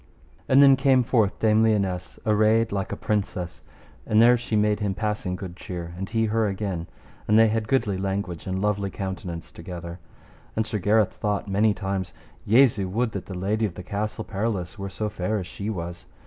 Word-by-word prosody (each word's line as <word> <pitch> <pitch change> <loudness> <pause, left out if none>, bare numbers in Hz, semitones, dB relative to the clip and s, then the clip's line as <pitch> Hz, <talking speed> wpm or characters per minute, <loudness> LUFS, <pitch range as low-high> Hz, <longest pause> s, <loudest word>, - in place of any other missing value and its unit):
And 135 +2 +7
then 135 -1 +8
came 135 -1 +4
forth 110 -4 +2
Dame 110 0 +3
Lionesse 100 -5 0
arrayed 110 +1 +3
like 100 -1 -2
a - - -2
princess, 100 -4 -2 0.4
and 110 - +2
there 120 +2 +7
she 115 -2 -3
made 105 0 +2
him 100 -3 -1
passing 105 -4 -2
good 90 -2 -7
cheer, 85 -3 -6
and 95 +2 -5
he 115 0 +1
her 110 0 +1
again; 95 -4 -3 0.4
and 105 - +4
they 115 0 +6
had 110 0 -1
goodly 105 -7 +1
language 95 -3 -3
and 95 0 -1
lovely 100 -1 0
countenance 95 -4 -6
together. 85 0 -8 0.6
And 110 - +1
Sir 110 -1 -3
Gareth 105 +2 +3
thought 105 -1 -2
many 100 +2 +2
times, 95 -3 -3 0.3
Jesu, 110 -4 +4
would 115 +4 0
that 100 - -6
the 95 - -6
lady 105 +4 0
of 90 - -10
the 90 - -7
Castle 105 +4 -3
Perilous 100 -2 -3
were 100 0 -4
so 105 +3 -3
fair 105 +1 -2
as 95 - -3
she 105 +1 -5
was. 90 -4 -5
105 Hz, 190 wpm, -25 LUFS, 95-110 Hz, 0.6 s, then